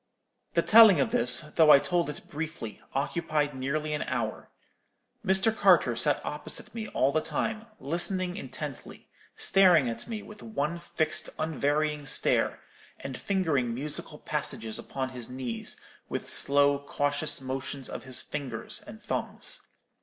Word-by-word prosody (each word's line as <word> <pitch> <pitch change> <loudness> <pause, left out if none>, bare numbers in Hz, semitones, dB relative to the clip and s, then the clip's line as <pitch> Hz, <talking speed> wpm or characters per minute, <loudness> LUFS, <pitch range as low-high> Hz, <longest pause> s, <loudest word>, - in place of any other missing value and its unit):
"The - - +3
telling 215 -7 +8
of - - +1
this, 125 +1 +4
though 150 +1 +3
I 145 - +10
told 155 +4 0
it 150 - -8
briefly, 150 -7 -6
occupied 150 +1 0
nearly 150 +4 -2
an 150 - -2
hour. 115 -4 -3 0.7
Mr. 190 +4 +3
Carter 180 - +4
sat 145 +5 +1
opposite 150 - -5
me 225 -2 -5
all 135 -7 +1
the 155 - +1
time, 215 +9 -2
listening 180 +4 -1
intently; 210 - -8 0.3
staring 180 -8 +5
at 115 - -4
me 220 -3 -5
with 210 -1 -12
one 170 -6 -2
fixed 160 -2 -1
unvarying 150 -1 0
stare, - - +1 0.4
and 135 -1 -6
fingering 145 - 0
musical 145 +4 -5
passages 110 -1 -3
upon 130 -1 -4
his 125 -3 -6
knees, 125 -3 -5 0.3
with - - -4
slow 140 0 +4
cautious 145 +1 +1
motions 135 +1 -4
of - - -7
his 130 -2 -2
fingers 125 -6 -5
and 220 +2 -11
thumbs. - - -2
150 Hz, 140 wpm, -28 LUFS, 135-170 Hz, 0.7 s, I